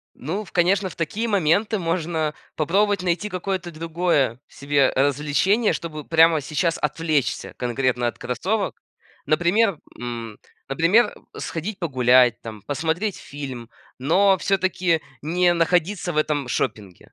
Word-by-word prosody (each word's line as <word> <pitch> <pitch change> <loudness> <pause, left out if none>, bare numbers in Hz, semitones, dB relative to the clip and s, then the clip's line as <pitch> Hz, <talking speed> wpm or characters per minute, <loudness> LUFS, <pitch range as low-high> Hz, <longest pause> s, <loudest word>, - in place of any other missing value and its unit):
Ну, 180 +11 -4
конечно, 185 +2 +2
в - - -12
такие 205 +8 -2
моменты 205 +3 +2
можно 165 -3 -1 0.2
попробовать 200 +5 +1
найти 180 +3 -1
какое-то 185 -1 -3
другое 160 -6 0
себе 140 -1 +1
развлечение, 150 - +2
чтобы 155 -3 -5
прямо 165 0 +4
сейчас 160 +4 -1
отвлечься 150 -4 -1
конкретно 125 0 0
от - - -7
кроссовок. 190 - -2 0.5
Например, 175 +5 +2 0.2
м, 115 -3 -6 0.3
например, 170 - +3 0.2
сходить 185 +5 -4
погулять 125 -6 +3
там, 110 -3 -9
посмотреть 160 - -2
фильм, 130 -5 -8 0.3
но 190 +8 +4
всё-таки 185 -3 +1 0.2
не 175 +3 +2
находиться 175 +2 +1
в - - -7
этом 150 -4 0
шопинге. 105 -8 -4
165 Hz, 120 wpm, -23 LUFS, 140-185 Hz, 0.5 s, прямо